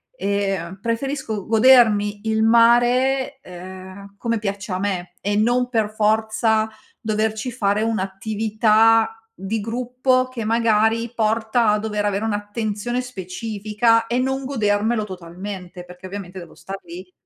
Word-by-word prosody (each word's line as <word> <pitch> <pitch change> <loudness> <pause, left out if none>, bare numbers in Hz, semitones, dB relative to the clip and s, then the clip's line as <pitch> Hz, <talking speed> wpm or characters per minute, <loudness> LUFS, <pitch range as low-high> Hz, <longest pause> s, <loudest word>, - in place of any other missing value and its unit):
ehm, 195 - -2
preferisco 230 -2 -3
godermi 220 -3 +4
il 220 0 +1
mare, 240 +4 +3
ehm, 185 +2 -11
come 230 +1 -1
piace 200 0 -4
a 185 - -1
me 185 -3 -3
e 205 +1 -1
non 245 +4 +2
per 225 -4 0
forza 220 +1 +1 0.3
doverci 220 +1 -1
fare 210 -3 0
un'attività 220 +2 +2 0.2
di 205 +2 -3
gruppo, 250 +3 0
che 240 -4 -5
magari 225 0 +2
porta 225 +1 +1
a 210 0 +2
dover 210 -1 -2
avere 205 +1 -1
un'attenzione 215 +2 -2
specifica 220 +1 -1
e 235 - -1
non 265 +1 -1
godermelo 220 -3 0
totalmente, 180 -1 -8
perché 180 +1 -13
ovviamente 190 -1 -7
devo 170 -2 -12
star 195 0 -7
lì 180 +2 -10
215 Hz, 125 wpm, -21 LUFS, 200-230 Hz, 0.3 s, godermi